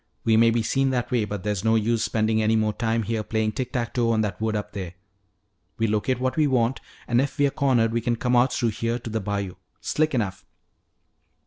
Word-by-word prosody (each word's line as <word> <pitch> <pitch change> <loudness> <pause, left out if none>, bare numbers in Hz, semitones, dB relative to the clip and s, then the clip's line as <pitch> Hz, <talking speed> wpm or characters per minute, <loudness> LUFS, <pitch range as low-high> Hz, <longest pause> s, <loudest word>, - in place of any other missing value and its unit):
We 115 - +3
may 115 +1 +6
be 115 0 +1
seen 135 +4 +1
that 125 -2 -1
way, 120 -4 +2
but 105 -2 -5
there's 105 -2 -2
no 110 0 +3
use 115 +1 +1
spending 110 0 +1
any 110 +1 +2
more 110 -1 +1
time 115 0 0
here 110 +1 -2
playing 110 0 -1
tick 125 +3 -4
tack 120 -4 -2
toe 120 -2 +1
on 110 -1 +2
that 105 0 -3
wood 110 -1 0
up 105 - -4
there. 90 -3 -6 0.8
We 115 - +1
locate 110 +4 0
what 130 0 -1
we 155 -2 +4
want, 125 -1 +1 0.3
and 120 +1 +3
if 140 +2 -3
we're 145 -2 +3
cornered 120 -6 +2
we 115 - 0
can 120 0 0
come 125 +2 0
out 120 +2 +4
through 120 - 0
here 115 +2 -2
to 115 - -8
the 110 0 -1
bayou. 100 -2 -3 0.2
Slick 155 -2 0
enough." 100 -6 -2
115 Hz, 230 wpm, -24 LUFS, 110-125 Hz, 0.8 s, may